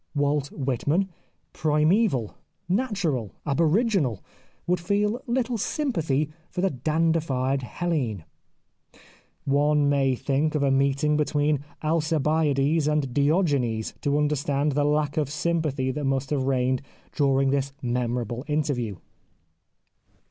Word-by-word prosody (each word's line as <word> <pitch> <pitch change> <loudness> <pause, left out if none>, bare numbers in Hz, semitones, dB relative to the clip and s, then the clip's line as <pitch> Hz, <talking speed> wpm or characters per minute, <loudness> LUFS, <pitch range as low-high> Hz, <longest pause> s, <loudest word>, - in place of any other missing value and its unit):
Walt 145 0 0
Whitman, 145 +8 0 0.4
primaeval, 155 - +2 0.3
natural, 180 - -1
aboriginal, 160 - +1 0.4
would 180 0 +1
feel 205 +6 0
little 240 -1 0
sympathy 160 - -1 0.2
for 180 - -3
the 195 - +2
dandified 145 -2 0
Hellene. 130 - -2 1.2
One 145 +1 +3
may 135 -2 +2
think 145 +5 0
of 145 - +1
a 140 - +3
meeting 140 +2 +2
between 150 -1 +1 0.2
Alcibiades 155 -1 +1
and 150 -4 0
Diogenes 140 - +1
to 145 0 +1
understand 145 0 +1
the 145 +1 +1
lack 150 +1 +1
of 150 -3 +1
sympathy 155 -4 -1
that 145 +2 -3
must 135 0 -1
have 135 -3 0
reigned 130 -1 +1 0.3
during 135 -2 +2
this 140 0 0
memorable 120 -1 -2
interview. 145 -8 -1
145 Hz, 110 wpm, -25 LUFS, 135-160 Hz, 1.2 s, One